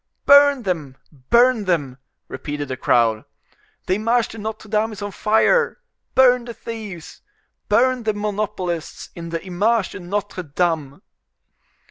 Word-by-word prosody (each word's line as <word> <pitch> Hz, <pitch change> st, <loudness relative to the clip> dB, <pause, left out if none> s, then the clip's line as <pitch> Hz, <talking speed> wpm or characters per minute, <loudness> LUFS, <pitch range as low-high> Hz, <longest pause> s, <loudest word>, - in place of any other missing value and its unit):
"Burn 285 Hz, -2 st, +6 dB
them! 155 Hz, -9 st, -3 dB, 0.3 s
burn 240 Hz, -2 st, +4 dB
them!" 145 Hz, -8 st, -1 dB, 0.3 s
repeated 145 Hz, -1 st, -5 dB
the 130 Hz, -, -2 dB
crowd. 115 Hz, -3 st, +2 dB, 0.6 s
"The 185 Hz, -, +1 dB
Image 230 Hz, +2 st, +1 dB
de 225 Hz, -, -9 dB
Notre 215 Hz, +1 st, -6 dB
Dame 215 Hz, +1 st, 0 dB
is 210 Hz, -, -10 dB
on 205 Hz, -, -4 dB
fire! 220 Hz, -, +2 dB, 0.4 s
Burn 250 Hz, -2 st, +5 dB
the 235 Hz, -1 st, -8 dB
thieves! 210 Hz, -8 st, -8 dB, 0.5 s
burn 250 Hz, +4 st, +3 dB
the 215 Hz, -2 st, -1 dB
monopolists 205 Hz, -5 st, -4 dB
in 170 Hz, -1 st, -8 dB
the 165 Hz, +2 st, -5 dB
Image 200 Hz, +3 st, +1 dB
de -, -, -8 dB
Notre 185 Hz, +1 st, -4 dB
Dame!" 155 Hz, -3 st, -2 dB
205 Hz, 135 wpm, -21 LUFS, 170-230 Hz, 0.6 s, Burn